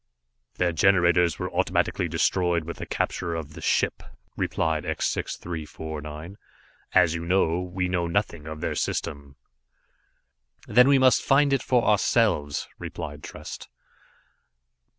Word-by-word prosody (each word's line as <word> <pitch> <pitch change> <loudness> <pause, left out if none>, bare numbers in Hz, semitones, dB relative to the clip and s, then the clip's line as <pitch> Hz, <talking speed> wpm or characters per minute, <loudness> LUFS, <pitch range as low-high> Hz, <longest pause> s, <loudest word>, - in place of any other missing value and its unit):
"Their 90 -1 +1
generators 85 -1 +3
were - - -4
automatically - - 0
destroyed 90 -3 +1
with 85 +2 -7
the - - -7
capture 85 -1 -2
of 75 -2 -6
the - - -10
ship," - - +1 0.3
replied 80 -1 -1
X - - -2
6349, 80 +1 -6 0.5
"as 85 -3 +5
you 85 0 -3
know. 85 -1 +2
We 90 0 -2
know 90 -1 0
nothing 85 -4 -2
of 80 0 -7
their - - -1
system." 70 -1 -3 1.3
"Then 125 +4 +6
we 140 0 +6
must 130 -1 +5
find 140 0 +3
it 135 - +2
for 125 -2 +2
ourselves," 105 -8 +2
replied 75 0 -6
Trest. - - -9
85 Hz, 130 wpm, -25 LUFS, 80-95 Hz, 1.3 s, Then